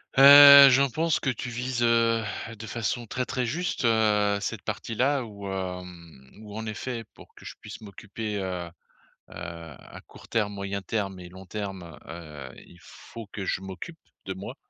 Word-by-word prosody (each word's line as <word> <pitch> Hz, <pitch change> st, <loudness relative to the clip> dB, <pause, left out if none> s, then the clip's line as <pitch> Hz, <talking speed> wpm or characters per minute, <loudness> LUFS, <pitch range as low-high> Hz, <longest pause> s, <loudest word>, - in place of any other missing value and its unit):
Heu, 140 Hz, 0 st, +10 dB
j'en 135 Hz, +2 st, +3 dB
pense 160 Hz, +4 st, 0 dB
que 135 Hz, -, -2 dB
tu 125 Hz, 0 st, -4 dB
vises, 120 Hz, +1 st, -3 dB
heu, 115 Hz, -1 st, +2 dB, 0.3 s
de 110 Hz, -, -8 dB
façon 120 Hz, +1 st, -3 dB
très, 130 Hz, +4 st, -3 dB
très 125 Hz, 0 st, -2 dB
juste, 155 Hz, +1 st, -2 dB
heu, 105 Hz, -3 st, +2 dB
cette -, -, -4 dB
partie-là 130 Hz, +4 st, -1 dB
où, 100 Hz, -2 st, -9 dB
hem, 90 Hz, -7 st, -7 dB
où 105 Hz, -1 st, -11 dB
en 110 Hz, -, -5 dB
effet, 115 Hz, +2 st, -5 dB
pour -, -, -18 dB
que -, -, -16 dB
je -, -, -8 dB
puisse -, -, -10 dB
m'occuper, 105 Hz, +1 st, -6 dB
heu, 95 Hz, -2 st, -4 dB
heu, -, -, -11 dB, 0.6 s
à 85 Hz, -4 st, -10 dB
court -, -, -16 dB
terme, 105 Hz, -3 st, -1 dB
moyen 100 Hz, 0 st, -4 dB
terme 95 Hz, -2 st, -3 dB
et 90 Hz, -1 st, -10 dB
long 95 Hz, +1 st, -13 dB
terme, 95 Hz, -5 st, -7 dB
heu, 75 Hz, -5 st, -9 dB
il 85 Hz, -, -17 dB
faut 115 Hz, +5 st, -12 dB
que 95 Hz, -, -6 dB
je 95 Hz, -, -2 dB
m'occupe 95 Hz, -, -9 dB, 0.3 s
de 95 Hz, -, -4 dB
moi. 95 Hz, +2 st, -8 dB
105 Hz, 175 wpm, -26 LUFS, 95-120 Hz, 0.6 s, Heu